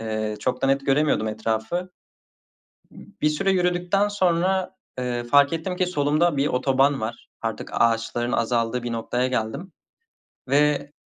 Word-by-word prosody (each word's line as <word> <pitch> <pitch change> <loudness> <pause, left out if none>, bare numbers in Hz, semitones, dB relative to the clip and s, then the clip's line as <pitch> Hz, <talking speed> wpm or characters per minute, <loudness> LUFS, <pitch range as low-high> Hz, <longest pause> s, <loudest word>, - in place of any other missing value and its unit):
eee, 110 -1 -3
çok 125 0 -2
da - - +3
net 135 0 +1
göremiyordum 135 -5 +2
etrafı. 110 +11 -2 1.0
Bir 150 - -3
süre 150 +6 0
yürüdükten 180 +2 +1
sonra, 185 -1 +1 0.3
ııı, 120 -1 -2
fark 140 +4 +4
ettim 165 +3 -3
ki 185 - +1
solumda 155 0 +1
bir 140 +1 +1
otoban 135 +1 +2
var. 110 +1 -6
Artık 115 -1 -4
ağaçların 115 +1 +1
azaldığı 115 +1 0
bir 120 -1 -4
noktaya 120 +2 -1
geldim 130 - -3 0.8
ve, 145 +1 +2
140 Hz, 135 wpm, -24 LUFS, 115-170 Hz, 1.0 s, fark